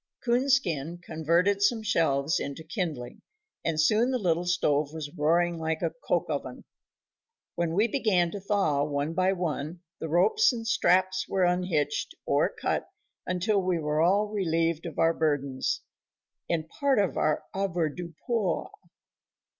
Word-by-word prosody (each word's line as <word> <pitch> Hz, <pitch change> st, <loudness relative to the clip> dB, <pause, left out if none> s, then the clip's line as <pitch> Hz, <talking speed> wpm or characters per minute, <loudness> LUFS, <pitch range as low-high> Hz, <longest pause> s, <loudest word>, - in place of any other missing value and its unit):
Coonskin 235 Hz, -, +1 dB
converted 175 Hz, +4 st, +1 dB
some 220 Hz, +2 st, +2 dB
shelves 160 Hz, -6 st, +1 dB
into 140 Hz, +3 st, -5 dB
kindling, 160 Hz, -, -4 dB, 0.4 s
and 160 Hz, -2 st, -1 dB
soon 215 Hz, +10 st, +3 dB
the 260 Hz, -, +1 dB
little 175 Hz, -5 st, 0 dB
stove 150 Hz, -4 st, +1 dB
was 155 Hz, -2 st, -6 dB
roaring 170 Hz, +2 st, +2 dB
like 160 Hz, 0 st, -2 dB
a -, -, +1 dB
coke -, -, +1 dB
oven. -, -, -5 dB, 0.9 s
When 170 Hz, -1 st, -1 dB
we 210 Hz, +4 st, +3 dB
began 205 Hz, -9 st, +1 dB
to 205 Hz, -, -5 dB
thaw, 190 Hz, -8 st, +1 dB
one 145 Hz, +1 st, -2 dB
by 185 Hz, +2 st, +2 dB
one 170 Hz, -2 st, -3 dB, 0.2 s
the 160 Hz, -, -4 dB
ropes 435 Hz, -, +4 dB
and 230 Hz, -2 st, -5 dB
straps 185 Hz, -3 st, +2 dB
were 190 Hz, -1 st, +1 dB
unhitched, 180 Hz, -4 st, 0 dB
or -, -, +2 dB
cut, -, -, -3 dB, 0.4 s
until 195 Hz, +3 st, +1 dB
we 180 Hz, -1 st, 0 dB
were 150 Hz, -1 st, 0 dB
all 195 Hz, +5 st, +3 dB
relieved 165 Hz, -5 st, 0 dB
of 165 Hz, -, -8 dB
our 165 Hz, 0 st, +3 dB
burdens 145 Hz, -5 st, -1 dB, 0.7 s
and 160 Hz, -2 st, -1 dB
part 280 Hz, -, 0 dB
of 200 Hz, -4 st, +1 dB
our 155 Hz, -, +1 dB
avoirdupois. 180 Hz, +2 st, -2 dB
175 Hz, 140 wpm, -28 LUFS, 155-195 Hz, 0.9 s, ropes